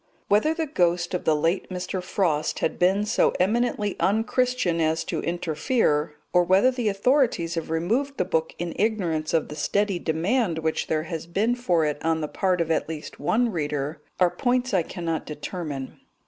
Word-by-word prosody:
Whether 220 +11 +3
the 325 -1 -1
ghost 175 - +1
of 180 - -2
the 155 - +4
late 165 +5 0
Mr. 185 0 -3
Frost 170 -5 0
has - - 0
been 190 +5 +2
so 215 - +2
eminently 210 +1 +1
unchristian 225 -3 +1
as 160 0 +1
to - - -3
interfere, 160 - 0 0.2
or 180 -1 +5
whether 190 +8 +4
the 245 -4 -1
authorities 205 - +2
have 165 -2 -4
removed 230 - 0
the 180 - +1
book 160 -3 -1
in 175 -1 -3
ignorance 180 -8 0
of 160 - +1
the 150 - -6
steady 200 +2 0
demand 175 +4 0
which 160 0 -1
there 155 -1 0
has 165 -1 -5
been 205 +7 +1
for 180 -10 +1
it 150 -1 -3
on 160 0 +1
the 155 - -2
part 185 +2 0
of 165 -1 -1
at 160 - 0
least 155 -2 -7
one 235 +1 +1
reader, 150 -2 -3 0.2
are 180 -2 +4
points 250 -1 0
I 185 - +4
cannot 165 -1 -3
determine. 150 -3 -6
175 Hz, 180 wpm, -25 LUFS, 160-215 Hz, 0.2 s, or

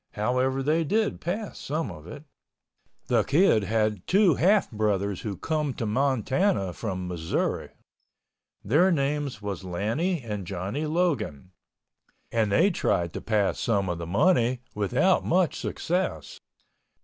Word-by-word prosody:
However, 130 +5 0
they 155 +4 +2
did 215 +7 0
pass 200 +4 -4
some 150 -5 -3
of 80 -1 -11
it. 145 +11 -9 0.8
The - - +3
Kid 140 - +3
had 105 -2 0
two 195 -3 +5
half 190 +9 +3
brothers 100 -3 -1
who 100 -4 -4
come 150 -4 -2
to 115 - -3
Montana 130 - +1
from 95 -4 -4
Missouri. 85 -2 -2 1.0
Their 155 - +4
names 140 - -1
was 100 -3 -4
Lannie 115 - -1
and 105 -5 -5
Johnny 100 - -3
Logan, 150 - -1 0.8
and 110 -3 +1
they 195 - +4
tried 85 - 0
to - - -5
pass 105 -3 0
some 100 -5 0
of 85 -1 -3
the 85 - -5
money 120 - +2
without 125 - +2
much 180 -1 +1
success. 160 - -3
120 Hz, 135 wpm, -26 LUFS, 100-160 Hz, 1.0 s, two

